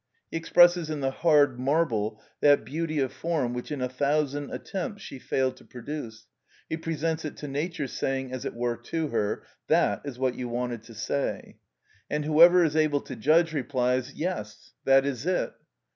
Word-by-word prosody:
He - - -1
expresses 175 0 +5
in 150 -2 -3
the 135 0 0
hard 145 -4 +3
marble 125 -7 0 0.2
that 145 -1 +5
beauty 155 +1 -3
of 135 -3 0
form 155 -8 -1
which 125 +4 -5
in 145 -3 -3
a 125 - +1
thousand 145 +2 0
attempts 195 +2 -5
she 135 - -8
failed 130 0 -1
to - - -16
produce, 120 -4 -7 0.4
he - - -2
presents 160 0 -2
it 155 - -6
to 150 - -6
nature, 150 +3 -2
saying, 135 0 -2
as 130 - -4
it - - -4
were, 120 0 -1
to 155 +6 -3
her, 105 -5 -1 0.2
"That - - +2
is 140 -4 -6
what 130 -1 +1
you 125 -1 -5
wanted 120 -1 -3
to 115 - -13
say!" 135 +6 -3 0.5
And 150 0 -1
whoever 170 +4 +7
is 155 -2 +1
able 155 -2 +2
to 130 - -8
judge 160 +7 +3
replies, 130 -1 0
"Yes, 130 - -4
that 135 0 +5
is 140 +2 -3
it." 185 - 0
140 Hz, 180 wpm, -27 LUFS, 125-160 Hz, 0.5 s, whoever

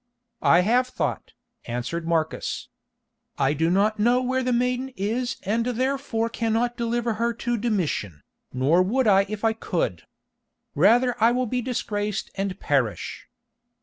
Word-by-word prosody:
"I 175 - +5
have 245 +6 +2
thought," - - -3 0.3
answered 125 +8 -4
Marcus. 160 -1 -1 0.7
"I 135 +1 +2
do 160 +3 +1
not 210 +4 +2
know 240 +4 +4
where 260 +1 0
the 255 0 0
maiden 250 +2 0
is 235 +6 -1
and 225 +4 0
therefore 250 -1 -1
cannot 230 +1 -1
deliver 235 0 -1
her 235 0 +1
to 240 +1 -1
Domitian, 175 - -2 0.3
nor 140 +8 +3
would 240 +8 +1
I 195 -2 +4
if 215 +1 -3
I 225 - +3
could. 165 - -3 0.7
Rather 235 - +4
will 240 +3 +4
I - - -1
be 250 +2 -1
disgraced 210 -4 -3
and 195 -1 -3
perish." - - -1
225 Hz, 145 wpm, -24 LUFS, 185-245 Hz, 0.7 s, I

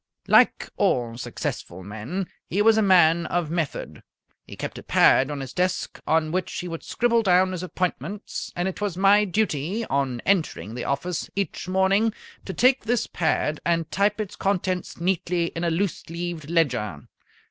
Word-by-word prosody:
Like - - +4
all 120 -2 +1
successful 95 -6 -5
men, 110 - -5 0.2
he 205 +4 +1
was 225 0 +6
a 220 - +3
man 170 -4 +5
of 175 -3 -1
method. 165 -4 -3 0.5
He - - -9
kept - - -5
a - - -9
pad 130 - +4
on 145 -2 -4
his 135 - -7
desk 185 0 -1
on 155 -1 +2
which 185 +2 -1
he 180 - -4
would 165 -1 -5
scribble 235 -1 +1
down 185 -2 +4
his 180 -2 -4
appointments, 185 +3 -4
and 175 +1 -1
it 190 - -5
was 200 -4 -2
my 200 +2 +5
duty 200 +1 -1
on 135 -3 0
entering 165 - 0
the 120 - -5
office 155 +5 -2
each 200 -2 -3
morning 190 +4 +2 0.3
to 190 - -5
take 255 -1 +3
this 235 0 +1
pad 155 -2 -1
and 165 -1 0
type 205 +2 +1
its 210 -2 -4
contents 185 -3 -1
neatly 175 -1 0
in 165 - -3
a 170 - +2
loose 170 +1 -2
leaved 170 -2 -5
ledger. 125 - 0
175 Hz, 170 wpm, -24 LUFS, 155-195 Hz, 0.5 s, was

